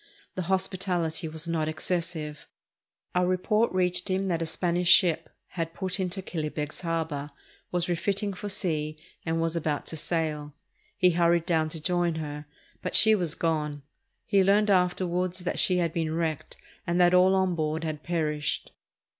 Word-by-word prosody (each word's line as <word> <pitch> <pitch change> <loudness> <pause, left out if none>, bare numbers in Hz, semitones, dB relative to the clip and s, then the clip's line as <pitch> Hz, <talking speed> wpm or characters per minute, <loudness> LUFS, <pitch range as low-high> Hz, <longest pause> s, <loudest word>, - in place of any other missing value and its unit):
The 185 - -3
hospitality 185 -3 0
was 160 +1 -3
not 160 -2 0
excessive. 155 -1 -3 0.7
A 180 - +2
report 185 +5 +1
reached 180 0 0
him 190 +1 0
that 170 -2 0
a 165 - -1
Spanish 175 +1 0
ship 175 -3 +5 0.2
had 165 -2 -4
put 190 0 -3
into 185 +1 -2
Killybegs 155 -3 -4
Harbor, 160 -4 -2 0.4
was 175 -1 0
refitting 195 +4 -1
for 205 +2 -6
sea, 155 -6 -1 0.3
and 165 0 0
was 165 0 0
about 150 -3 -1
to - - -6
sail. 150 -2 -2 0.4
He 180 -1 +5
hurried 170 0 +3
down 160 -2 +1
to 160 - -5
join 175 0 +1
her, 150 -2 -5 0.3
but - - -3
she 220 0 +9
was 175 -7 0
gone. 150 -3 -1 0.4
He 200 -2 +3
learned 205 +2 +4
afterward 180 -1 +1
that 180 -1 -3
she 185 -3 +4
had 170 -2 0
been 160 -1 -1
wrecked 160 -3 -3 0.3
and 170 +1 +1
that 175 0 +5
all 185 +1 +5
on 190 -1 +2
board 160 0 -2
had 155 -2 -3
perished. 155 -3 -2
170 Hz, 165 wpm, -27 LUFS, 160-185 Hz, 0.7 s, she